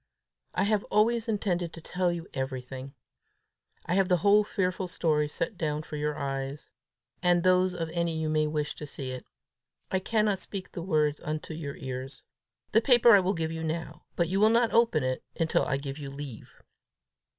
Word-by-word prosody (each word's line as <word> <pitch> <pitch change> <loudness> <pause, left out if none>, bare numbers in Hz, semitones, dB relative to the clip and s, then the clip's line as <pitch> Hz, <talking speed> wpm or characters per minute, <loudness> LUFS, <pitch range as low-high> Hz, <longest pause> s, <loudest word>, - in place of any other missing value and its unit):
I - - +2
have 205 0 +2
always 230 +2 +2
intended 180 -6 -1
to - - -8
tell 180 +2 0
you 170 -1 -5
everything. 130 +1 -5 0.9
I - - -1
have 190 0 +3
the 180 - +4
whole 205 +1 +6
fearful 185 -2 -1
story 155 -4 +1
set 165 +5 -4
down 150 -1 -1
for 150 - -7
your 150 0 -2
eyes 135 0 -4 0.5
and 175 -1 +3
those 185 0 +3
of 165 -2 -2
any 170 -1 -1
you 160 0 -1
may 155 0 +2
wish 150 -1 -2
to 150 - -6
see 135 -2 -6
it: 130 -1 -7 0.6
I 190 - +2
cannot 210 0 +1
speak 195 0 -6
the 175 - -5
words 155 -4 +1
into 155 +1 -4
your 145 -3 -5
ears. 130 +1 -6 0.5
The 225 - +5
paper 240 -1 +6
I 205 - +9
will 190 +1 0
give 160 -1 -2
you 160 0 -4
now; 160 -1 -4
but 170 - +1
you 190 +3 0
will 215 +1 +6
not 230 0 +3
open 230 - +4
it 130 0 -1 0.2
until 165 -1 +2
I 135 - +1
give 140 +1 -6
you 140 -2 -6
leave." 140 -4 -8
165 Hz, 190 wpm, -28 LUFS, 150-190 Hz, 0.9 s, I